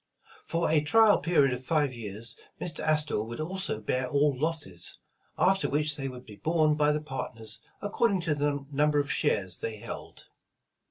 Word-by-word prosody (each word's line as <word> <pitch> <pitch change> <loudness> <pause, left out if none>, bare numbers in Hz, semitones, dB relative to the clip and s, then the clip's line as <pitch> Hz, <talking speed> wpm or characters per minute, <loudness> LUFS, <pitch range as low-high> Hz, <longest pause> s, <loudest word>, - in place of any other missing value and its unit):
For 165 +1 +1
a 155 -2 +4
trial 215 +7 +5
period 145 -6 +3
of 125 +1 -5
five 145 -2 +1
years, 110 -1 -5 0.2
Mr. 160 -4 -2
Astor 150 -6 +1
would 115 +4 -6
also 185 - -2
bear 125 +4 -1
all 145 0 +3
losses, 145 - -2 0.4
after 195 +1 +3
which 150 +1 +1
they 135 -1 -3
would 125 -1 -8
be 105 -2 -12
borne 155 +6 +2
by 150 0 +3
the 150 - 0
partners 115 -7 -5 0.2
according 205 -1 +1
to 165 -3 0
the 145 -1 -1
number 150 +1 +2
of 145 0 +1
shares 95 -3 0
they 110 -1 -4
held. - - -8
145 Hz, 170 wpm, -29 LUFS, 125-155 Hz, 0.4 s, trial